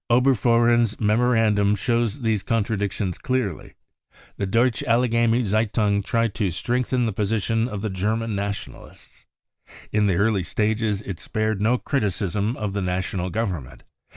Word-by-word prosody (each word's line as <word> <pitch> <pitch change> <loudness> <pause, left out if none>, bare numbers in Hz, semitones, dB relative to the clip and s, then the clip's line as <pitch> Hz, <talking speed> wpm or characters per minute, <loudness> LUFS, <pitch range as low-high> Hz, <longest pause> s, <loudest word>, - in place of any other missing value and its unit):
Oberfohren's 120 -2 +3
memorandum 110 -2 +3
shows 115 +3 -1
these 110 -4 0
con 115 +1 0
tradictions 100 -3 -2
clearly. 125 -10 -2 0.6
The 100 - -2
Deutsche 115 +1 +2
Allgemeine 115 0 +2
Z 105 -1 -1
e - - +4
^ 105 - -13
un 105 -2 +3
E - - 0
tried 115 +1 0
to 105 -4 -1
strengthen 125 +7 -1
the 110 - -1
position 110 +3 0
of 105 -4 -5
the 110 - -1
German 110 +4 -1
Nationalises, 100 0 -7 0.7
In 105 -1 +2
the 95 - +2
early 100 +1 +2
stages 105 +2 -1
it 95 -5 -6
spared 110 -2 -2
no 115 +4 +3
criticism 105 - -1
of 105 -2 -3
the 100 - -2
National 90 0 -2
Govern 90 - -2
ment. 65 -1 -16
110 Hz, 155 wpm, -23 LUFS, 100-115 Hz, 0.7 s, e